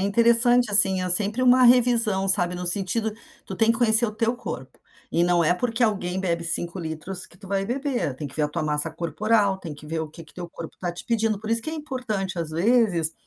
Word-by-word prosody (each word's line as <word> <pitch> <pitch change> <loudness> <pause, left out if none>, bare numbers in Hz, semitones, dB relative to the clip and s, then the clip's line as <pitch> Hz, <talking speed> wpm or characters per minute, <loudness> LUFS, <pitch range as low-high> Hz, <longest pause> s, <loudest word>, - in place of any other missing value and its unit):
interessante, 235 +3 +3
assim, 190 -2 +6
é 185 - -2
sempre 205 +6 +3
uma 255 0 +5
revisão, 235 -5 +3
sabe, 180 -2 +4
no 180 0 -5
sentido 200 +4 -1 0.3
tu - - -7
tem 225 0 +2
que 230 - 0
conhecer 230 -1 +3
o 225 - -1
teu 230 +2 -1
corpo, 130 - -8 0.4
e 170 - +2
não 175 -1 +2
é 165 - +3
porque 230 +5 -1
alguém 190 -4 -2
bebe 170 -3 -2
5 170 +2 -3
litros, 165 +3 -7
que - - -20
tu 200 - -13
vai 195 0 -1
beber, 245 - -3
tem 145 - -6
que 140 - -11
ver 155 - -1
a 150 - +1
tua 150 - -4
massa 150 -1 -1
corporal, 200 +4 0
tem 170 -5 -8
que 145 +1 -13
ver 160 +1 -3
o 160 - -5
que 165 +2 -13
que 155 - -20
teu 175 -1 -8
corpo 165 - -9
está 175 -1 -5
te 175 - -10
pedindo, 225 -3 0
por 215 +1 -9
isso 230 0 0
que 315 - -5
é - - -5
importante, 250 - -4
às 160 -2 -5
vezes, 175 -2 +1
195 Hz, 240 wpm, -23 LUFS, 170-230 Hz, 0.4 s, assim